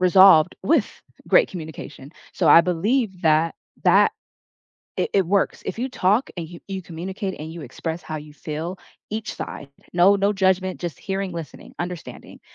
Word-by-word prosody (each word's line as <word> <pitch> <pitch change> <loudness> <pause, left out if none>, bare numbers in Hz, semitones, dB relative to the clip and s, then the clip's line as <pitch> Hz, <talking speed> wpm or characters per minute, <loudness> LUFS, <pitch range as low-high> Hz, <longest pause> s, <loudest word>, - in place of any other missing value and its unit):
resolved 180 -2 +7
with 300 -7 +3 0.4
great - - +5
communication. 155 -5 -9 0.2
So, 170 -5 +1
I 165 - +9
believe 190 +3 0
that 160 0 +3 0.3
that - - +5 0.9
it - - 0
it 195 -2 +3
works, 200 +2 +1
if 190 - -4
you 260 +2 -1
talk 210 +3 +1
and 165 - -4
y 170 -1 -10
you 190 -1 -4
communicate 190 +4 -5
and 155 +1 -6
you 170 - -8
express 160 +5 -5
how 155 - -5
you 150 0 -11
feel, 160 +4 -5 0.3
each 215 0 -4
side, 140 - -7 0.2
no 180 +3 +6
no 200 +1 +2
judgment, 190 -1 +1
just 170 -6 -5
hearing, 195 -1 -3
listening, 165 -5 -8
understanding, 175 -1 -7
180 Hz, 165 wpm, -23 LUFS, 160-195 Hz, 0.9 s, I